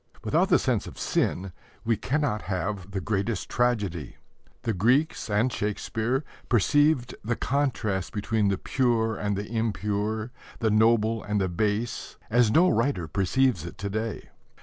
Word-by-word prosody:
Without -, -, +2 dB
the -, -, +6 dB
sense -, -, 0 dB
of -, -, -10 dB
sin 95 Hz, +1 st, -1 dB, 0.3 s
we 115 Hz, 0 st, +3 dB
cannot 135 Hz, -4 st, -1 dB
have 95 Hz, 0 st, -3 dB
the 100 Hz, 0 st, -3 dB
greatest 100 Hz, +2 st, -2 dB
tragedy. 105 Hz, -, 0 dB, 0.5 s
The 115 Hz, -, 0 dB
Greeks 125 Hz, -, +2 dB
and 110 Hz, +4 st, +2 dB
Shakespeare 110 Hz, +5 st, -1 dB, 0.3 s
perceived 135 Hz, +3 st, +3 dB
the 115 Hz, +3 st, 0 dB
contrast 115 Hz, -10 st, -1 dB
between 105 Hz, 0 st, 0 dB
the 100 Hz, -1 st, +1 dB
pure 115 Hz, -3 st, +1 dB
and 105 Hz, -2 st, -1 dB
the 100 Hz, -, -3 dB
impure, 110 Hz, +1 st, -1 dB, 0.3 s
the 110 Hz, -2 st, +1 dB
noble 110 Hz, 0 st, +3 dB
and 105 Hz, 0 st, -1 dB
the 95 Hz, -1 st, 0 dB
base, 110 Hz, +5 st, -2 dB
as 120 Hz, -1 st, +4 dB
no 170 Hz, +11 st, +5 dB
writer 115 Hz, -, +1 dB
perceives 100 Hz, -, +1 dB
it 85 Hz, -, -8 dB
to 100 Hz, 0 st, -4 dB
day. 110 Hz, +1 st, -3 dB
110 Hz, 150 wpm, -26 LUFS, 100-120 Hz, 0.5 s, the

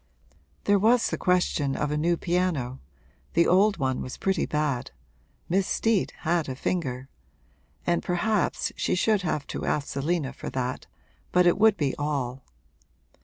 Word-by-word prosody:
There 200 Hz, 0 st, +3 dB
was 230 Hz, +4 st, +3 dB
the -, -, -1 dB
question 175 Hz, -6 st, +1 dB
of 150 Hz, 0 st, -1 dB
a -, -, 0 dB
new 170 Hz, +3 st, +1 dB
piano 170 Hz, -9 st, -1 dB, 0.5 s
(the 170 Hz, +1 st, +4 dB
old 200 Hz, +3 st, +4 dB
one 130 Hz, -2 st, -1 dB
was 130 Hz, -, -6 dB
pretty 190 Hz, -3 st, 0 dB
bad 150 Hz, -5 st, -1 dB, 0.6 s
Miss 190 Hz, +2 st, +1 dB
Steet 225 Hz, -4 st, +1 dB
had 170 Hz, -2 st, 0 dB
a 130 Hz, -, -3 dB
finger!) 130 Hz, -4 st, -2 dB, 0.8 s
and 170 Hz, 0 st, +1 dB
perhaps 195 Hz, +3 st, 0 dB
she -, -, 0 dB
should 210 Hz, +2 st, +2 dB
have 155 Hz, -5 st, -2 dB
to -, -, -5 dB
ask 145 Hz, -2 st, -1 dB
Selina 145 Hz, 0 st, -1 dB
for -, -, -6 dB
that 130 Hz, -1 st, -3 dB, 0.4 s
but 180 Hz, 0 st, +4 dB
it 175 Hz, +2 st, +4 dB
would 220 Hz, -1 st, +5 dB
be 140 Hz, -3 st, 0 dB
all. 135 Hz, -3 st, -2 dB
170 Hz, 155 wpm, -26 LUFS, 140-185 Hz, 0.8 s, would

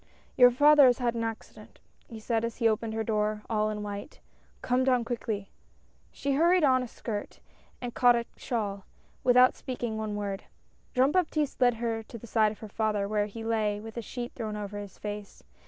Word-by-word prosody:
" -, -, -33 dB
Your 250 Hz, -1 st, +8 dB
father 290 Hz, +2 st, +7 dB
has 245 Hz, -, +4 dB
had 240 Hz, -2 st, 0 dB
an 230 Hz, -1 st, -2 dB
accident," 225 Hz, -1 st, -7 dB, 0.3 s
he 225 Hz, -3 st, -9 dB
said, 225 Hz, +1 st, -1 dB
as 230 Hz, -1 st, -3 dB
she 230 Hz, -, +3 dB
opened 220 Hz, 0 st, -1 dB
her 225 Hz, -, -1 dB
door, 210 Hz, -1 st, -1 dB
all 215 Hz, -1 st, +1 dB
in 210 Hz, -1 st, -4 dB
white. 205 Hz, -1 st, -7 dB, 0.2 s
" -, -, -34 dB
Come 250 Hz, +1 st, +2 dB
down, 250 Hz, -3 st, +2 dB
quickly." 220 Hz, -4 st, -4 dB, 0.6 s
She 280 Hz, 0 st, -2 dB
hurried 340 Hz, +4 st, +4 dB
on 260 Hz, -3 st, +4 dB
a 250 Hz, -, -4 dB
skirt, 215 Hz, -2 st, -6 dB, 0.4 s
and 245 Hz, -1 st, -5 dB
caught 245 Hz, -1 st, +5 dB
a 235 Hz, 0 st, -1 dB
shawl, 200 Hz, -5 st, -3 dB, 0.4 s
without 250 Hz, 0 st, +6 dB
speaking 240 Hz, -4 st, -4 dB
one 215 Hz, -1 st, -3 dB
word. 200 Hz, -1 st, -4 dB, 0.5 s
Jean 260 Hz, +3 st, +4 dB
Baptiste 310 Hz, -6 st, 0 dB
led 245 Hz, -1 st, +5 dB
her 225 Hz, -1 st, -2 dB
to 225 Hz, +2 st, -10 dB
the 230 Hz, -, -11 dB
side 220 Hz, -2 st, +2 dB
of 215 Hz, -, -10 dB
her 220 Hz, -, -7 dB
father, 210 Hz, -1 st, -1 dB
where 210 Hz, 0 st, 0 dB
he 225 Hz, +2 st, -8 dB
lay 215 Hz, -2 st, 0 dB
with 220 Hz, +1 st, -9 dB
a 235 Hz, -, -3 dB
sheet 240 Hz, +3 st, -6 dB
thrown 220 Hz, -3 st, -4 dB
over 205 Hz, 0 st, -5 dB
his 205 Hz, -1 st, -9 dB
face. 205 Hz, -1 st, -7 dB
225 Hz, 205 wpm, -28 LUFS, 210-245 Hz, 0.6 s, Your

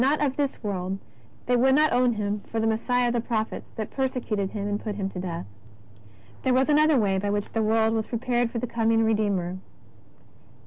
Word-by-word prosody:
35 280 Hz, +4 st, +3 dB
not 295 Hz, -, +2 dB
of -, -, -18 dB
this 280 Hz, -4 st, -2 dB
world, 190 Hz, -2 st, -2 dB, 0.5 s
they 250 Hz, -, +2 dB
would 265 Hz, +2 st, +4 dB
not 305 Hz, -1 st, +4 dB
own 245 Hz, 0 st, +3 dB
Him 210 Hz, -1 st, -2 dB
for 225 Hz, -, -3 dB
the 220 Hz, -, +1 dB
Messiah 240 Hz, +2 st, +1 dB
of -, -, -1 dB
the 240 Hz, -, +1 dB
prophets, 225 Hz, -2 st, -3 dB
but 215 Hz, -2 st, -4 dB
persecuted 245 Hz, -7 st, -1 dB
Him 205 Hz, -1 st, -4 dB
and 205 Hz, 0 st, -2 dB
put 210 Hz, -2 st, -3 dB
Him 195 Hz, -2 st, -2 dB
to 190 Hz, -, -7 dB
death. 175 Hz, -, -4 dB, 1.0 s
There 255 Hz, -1 st, +2 dB
was 265 Hz, +3 st, +3 dB
another 305 Hz, 0 st, +5 dB
way 195 Hz, -4 st, +2 dB
by 205 Hz, +1 st, -2 dB
which 205 Hz, 0 st, -1 dB
the 225 Hz, -, 0 dB
world 220 Hz, +1 st, +2 dB
was 220 Hz, -1 st, -1 dB
pre 235 Hz, -, -2 dB
pared 240 Hz, 0 st, 0 dB
for 235 Hz, -, -5 dB
the 235 Hz, -, -1 dB
coming 225 Hz, -1 st, +2 dB
Redeemer. 200 Hz, -5 st, 0 dB
225 Hz, 220 wpm, -26 LUFS, 205-250 Hz, 1.0 s, another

